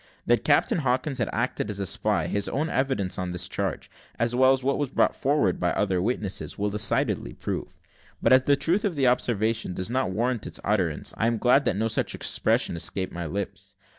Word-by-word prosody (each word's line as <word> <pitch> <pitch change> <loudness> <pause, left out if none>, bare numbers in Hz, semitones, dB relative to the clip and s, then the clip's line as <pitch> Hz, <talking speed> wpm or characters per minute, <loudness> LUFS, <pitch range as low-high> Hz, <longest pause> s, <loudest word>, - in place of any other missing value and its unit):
That - - +2
Captain 225 -8 +3
Hawkins 130 0 -1
had 120 - 0
acted 120 -2 -2
as 100 -1 -3
a 100 - -1
spy, - - 0
his 100 0 0
own 155 +4 -1
evidence 130 -10 0
on 90 -1 -3
this 90 - 0
charge, - - -3 0.3
as 115 +1 0
well 130 +1 +5
as 135 0 +1
that 140 +1 -1
brought - - +3
forward 135 -9 +1
by - - +1
other 90 -2 0
witnesses, 105 -2 -3
will 105 0 -1
decidedly 105 -1 0
prove; - - -5 0.4
but - - +4
as 130 - +7
the 140 +2 +3
truth 175 +9 +1
of 200 -6 -1
the 140 -2 +1
observation 110 -5 +1
does 95 +5 -2
not 130 -4 0
warrant 115 +3 -1
its - - -5
utterance, 95 -7 0
I 115 - +1
am 115 0 +1
glad 125 +5 +3
that - - +1
no 110 +2 +1
such 110 - -1
expression - - +1
escaped 95 +3 -3
my 85 -1 -4
lips. 100 +5 -6
115 Hz, 205 wpm, -26 LUFS, 100-130 Hz, 0.4 s, as